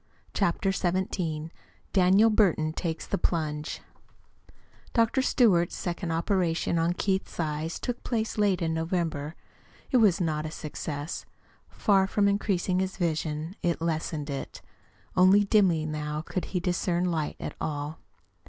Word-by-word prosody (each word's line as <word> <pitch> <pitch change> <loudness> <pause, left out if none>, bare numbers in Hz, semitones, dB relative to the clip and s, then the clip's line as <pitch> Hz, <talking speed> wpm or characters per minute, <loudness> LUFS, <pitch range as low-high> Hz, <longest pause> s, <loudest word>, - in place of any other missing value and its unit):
CHAPTER 195 0 +1
XVII 175 -4 -1 0.4
DANIEL 195 +4 +5
BURTON 170 -7 +2
TAKES 165 -1 -3
THE - - -2
PLUNGE 155 -3 -1 1.1
Dr. 230 +3 +3
Stewart's 195 -10 +3
second 175 0 -3
operation 170 -1 +1
on 165 +1 +2
Keith's 190 0 -2
eyes 155 0 -2
took 245 -1 -4
place 220 -2 -2
late 195 -4 +2
in 160 -1 0
November. 160 -2 -2 0.6
It 255 - +5
was 210 -7 +4
not 155 -3 -1
a - - -4
success. 155 0 -5 0.4
Far 195 -3 +3
from 200 0 +2
increasing 195 -2 +1
his 190 0 -2
vision, 160 -1 -2
it 170 -1 0
lessened 160 -2 -2
it. 135 - -6 0.5
Only 190 +3 +6
dimly 190 -6 +3
now 150 0 -3
could 185 - -3
he 180 - -2
discern 175 0 0
light 155 -3 -2
at - - -5
all. 150 +1 -3
170 Hz, 135 wpm, -28 LUFS, 155-195 Hz, 1.1 s, Only